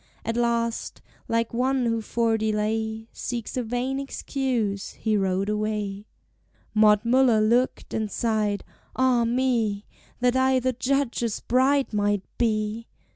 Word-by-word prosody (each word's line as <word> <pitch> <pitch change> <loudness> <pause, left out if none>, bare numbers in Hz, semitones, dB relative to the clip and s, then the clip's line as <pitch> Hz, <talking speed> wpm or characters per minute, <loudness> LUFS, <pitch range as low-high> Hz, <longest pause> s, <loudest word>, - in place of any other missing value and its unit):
At 230 - -1
last, 235 -1 -1 0.3
like 230 0 0
one 255 +1 +1
who 230 -1 0
for 230 +1 +1
delay 220 +1 -1
Seeks 235 -3 -4
a 255 - 0
vain 245 +3 -2
excuse, 250 -7 -2
he 220 -1 -1
rode 195 -1 0
away. 210 -1 -2 0.7
Maud 215 0 +5
Muller 245 -2 +4
looked 235 +4 +1
and 220 -1 -1
sighed: 215 -2 0 0.3
"Ah 255 -2 +3
me! 230 -4 0 0.3
That 245 0 +2
I 260 0 +3
the 255 +1 0
Judge's 250 -3 -1
bride 265 +1 +2
might 205 -1 +1 0.2
be! 220 -1 0
230 Hz, 130 wpm, -25 LUFS, 215-250 Hz, 0.7 s, Maud